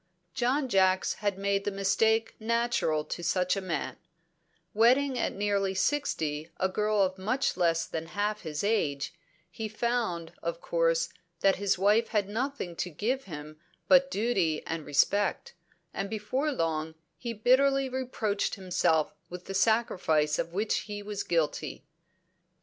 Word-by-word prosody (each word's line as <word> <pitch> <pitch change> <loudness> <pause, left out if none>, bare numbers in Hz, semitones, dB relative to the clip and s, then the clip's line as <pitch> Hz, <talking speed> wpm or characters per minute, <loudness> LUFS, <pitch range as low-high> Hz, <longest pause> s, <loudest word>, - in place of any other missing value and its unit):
John 265 +2 +1
Jacks 190 -4 +3
had 205 -2 0
made 200 0 0
the - - 0
mistake 220 +3 +2
natural 225 -9 0
to - - -5
such 180 +1 +1
a 195 - -2
man; 185 -3 -3 0.8
wedding 255 +5 +4
at - - 0
nearly 200 -1 0
sixty 160 - -1
a 190 - +2
girl 210 +1 +1
of 190 0 -2
much 255 +8 0
less 170 -2 +2
than 165 0 -5
half 210 +1 0
his 155 -1 -4
age, 160 -9 0 0.4
he 220 +4 -4
found, 220 -7 -1
of 170 0 -3
course, 165 -1 +1 0.3
that 195 -1 +4
his 200 -1 +1
wife 210 +4 +3
had 210 -3 0
nothing 225 -4 -3
to 180 - -2
give 230 - -2
him 155 -2 -8 0.3
but 275 0 +6
duty 195 - 0
and 165 -2 -4
respect, 205 - +1 0.4
and 200 - -3
before 220 +8 -1
long 160 - -2 0.2
he 235 - -5
bitterly 265 +5 +3
reproached 250 -5 -2
himself 175 -5 +1 0.2
with 180 0 -8
the 195 - -5
sacrifice 185 -8 +2
of 170 - -2
which 205 +4 0
he 205 0 -5
was 205 -1 -4
guilty. 165 -3 -1
200 Hz, 145 wpm, -29 LUFS, 170-230 Hz, 0.8 s, but